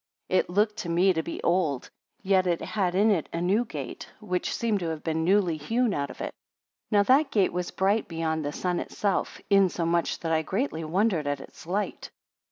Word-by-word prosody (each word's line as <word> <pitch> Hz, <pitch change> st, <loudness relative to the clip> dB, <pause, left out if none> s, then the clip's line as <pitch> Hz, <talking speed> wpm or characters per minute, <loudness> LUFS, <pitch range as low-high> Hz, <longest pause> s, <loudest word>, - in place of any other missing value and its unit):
14 185 Hz, -, +5 dB
It -, -, -2 dB
looked 210 Hz, +4 st, +1 dB
to 175 Hz, -, -4 dB
me 180 Hz, +3 st, +4 dB
to 160 Hz, -, 0 dB
be 165 Hz, -, -6 dB
old, 165 Hz, -7 st, 0 dB, 0.3 s
yet 190 Hz, -1 st, +3 dB
it 170 Hz, -1 st, +1 dB
had 185 Hz, -4 st, -1 dB
in 210 Hz, +3 st, +4 dB
it 175 Hz, -7 st, 0 dB
a 170 Hz, -, -3 dB
new 195 Hz, +7 st, +2 dB
gate, 145 Hz, -, -7 dB
which 185 Hz, -4 st, -2 dB
seemed 225 Hz, -3 st, 0 dB
to 175 Hz, -, -3 dB
have 160 Hz, -1 st, -5 dB
been 160 Hz, 0 st, -1 dB
newly 180 Hz, -2 st, +3 dB
hewn 225 Hz, +8 st, 0 dB
out 140 Hz, -3 st, -2 dB
of -, -, -10 dB
it. -, -, -4 dB, 0.6 s
Now 205 Hz, -2 st, +4 dB
that 270 Hz, +7 st, +4 dB
gate 200 Hz, -4 st, +2 dB
was 180 Hz, 0 st, -2 dB
bright 200 Hz, +3 st, +1 dB
beyond 160 Hz, -1 st, -2 dB
the 145 Hz, -, -2 dB
sun 180 Hz, +2 st, -1 dB
itself; 200 Hz, -3 st, -2 dB
insomuch, 170 Hz, -3 st, +2 dB
that 165 Hz, -, -2 dB
I 160 Hz, -1 st, +3 dB
greatly 190 Hz, -, -2 dB
wondered 175 Hz, -1 st, +1 dB
at 145 Hz, -1 st, -1 dB
its 135 Hz, -, -13 dB
light. 200 Hz, +4 st, -2 dB
180 Hz, 205 wpm, -27 LUFS, 160-205 Hz, 0.6 s, 14